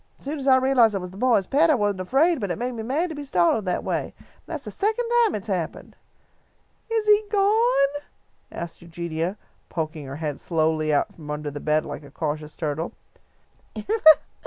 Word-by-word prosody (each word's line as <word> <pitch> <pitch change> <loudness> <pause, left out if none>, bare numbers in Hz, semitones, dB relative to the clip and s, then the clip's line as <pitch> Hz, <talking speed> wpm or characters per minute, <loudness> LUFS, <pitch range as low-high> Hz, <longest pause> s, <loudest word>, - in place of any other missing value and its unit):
As - - -16
soon 295 +2 -3
as 270 - -4
I 265 - +7
realised 255 -5 +4
that - - +2
it - - -5
was 180 0 -7
the 190 - -12
boys' 230 -4 +3
pet 310 - +3
I 305 - +5
wasn't 205 -4 0
afraid, 280 - +2
but 200 -4 -3
it 175 - -2
made 245 +1 -2
me 230 -2 -5
mad 295 +10 -1
to - - -6
be 290 - -6
startled 190 -3 +2
that 180 - -1
way. - - -3
And - - -19 0.2
that's - - -5
the - - -5
second 440 +4 0 0.2
time 445 - +1
it 205 - -5
has 200 -4 0
happened." 170 -3 -6 0.9
"Is 450 -1 0
he 420 0 +6
gone?" 405 - +2 0.5
asked 170 -1 -7
Eugenia, 170 +2 -4 0.3
poking 155 -3 -4
her 135 - -6
head 150 -2 -4
slowly 155 -2 0
out 145 - +1
from 150 -3 -12
under 150 0 -4
the 145 - -6
bed 155 +1 +1
like - - -6
a 145 - -13
cautious 150 +1 -4
turtle. 155 +1 -3
195 Hz, 205 wpm, -24 LUFS, -, 0.9 s, I